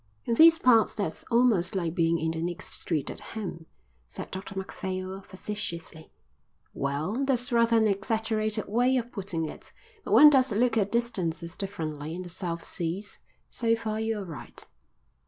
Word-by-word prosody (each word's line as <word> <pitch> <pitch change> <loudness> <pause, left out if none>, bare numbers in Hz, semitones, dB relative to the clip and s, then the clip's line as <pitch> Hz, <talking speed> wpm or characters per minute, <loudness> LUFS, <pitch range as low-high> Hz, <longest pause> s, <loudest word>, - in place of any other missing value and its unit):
"In 235 - 0
these 330 +6 +8
parts 240 -7 +4
that's 200 -6 -3
almost 230 -7 +3
like 170 -4 -1
being 170 -1 +2
in 160 0 -1
the 160 0 -4
next 175 0 -4
street 155 -5 -2
at - - -9
home," 180 -7 -7 0.4
said - - -8
Dr 190 +1 -7
Macphail 190 0 -4
facetiously. 175 -5 -6 0.6
"Well, 155 - -2
that's 250 -3 0
rather 230 -1 +4
an 220 -1 +4
exaggerated 215 +1 -1
way 245 +5 +2
of 240 -1 -3
putting 185 -6 -3
it, - - -9 0.3
but - - -2
one 300 0 +10
does 265 -3 +4
look 235 +4 +2
at 205 -3 +1
distances 180 -8 -1
differently 160 -5 -4
in 185 - -5
the 175 - -9
South 170 -1 -3
Seas. 180 +4 -3 0.3
So 230 -2 +1
far 220 -1 -3
you're 220 -2 -2
right." 165 -4 -9
200 Hz, 160 wpm, -28 LUFS, 170-230 Hz, 0.6 s, one